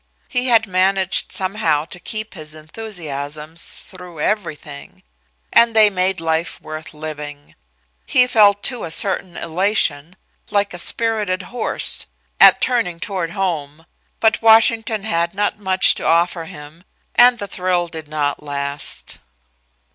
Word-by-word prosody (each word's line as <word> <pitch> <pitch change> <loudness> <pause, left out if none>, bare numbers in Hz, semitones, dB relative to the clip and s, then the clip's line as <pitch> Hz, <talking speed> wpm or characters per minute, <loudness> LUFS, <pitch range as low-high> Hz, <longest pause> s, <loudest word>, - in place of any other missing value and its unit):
He 250 +1 -1
had 230 -2 +4
managed 190 0 +1
somehow 185 -6 0
to 180 - -9
keep 215 +4 -5
his 155 -3 -9
enthusiasms 155 -3 -5
through 180 -4 -12
everything 150 - -4 0.5
and 235 -1 +5
they 215 -1 +6
made 185 -1 +1
life 165 +1 -2
worth 155 0 -9
living. 150 -1 -8 0.5
He 250 - +4
felt 205 -4 +4
too 250 -3 0
a - - -4
certain 185 +1 -1
elation 180 -2 0 0.3
like 205 -1 0
a 175 - -6
spirited 210 -2 0
horse 245 - -3 0.3
at - - +7
turning 230 -10 0
toward 175 -3 -3
home, 165 -5 -3 0.3
but 220 -1 +2
Washington 225 -1 +4
had 170 -4 -1
not 205 +1 -1
much 190 -2 +3
to - - -6
offer 170 0 +1
him, 150 +2 -12 0.3
and 245 0 +6
the 205 - -4
thrill 180 -2 -1
did 160 -2 -8
not 150 -2 -2
last. 140 0 -4
180 Hz, 130 wpm, -19 LUFS, 155-210 Hz, 0.5 s, at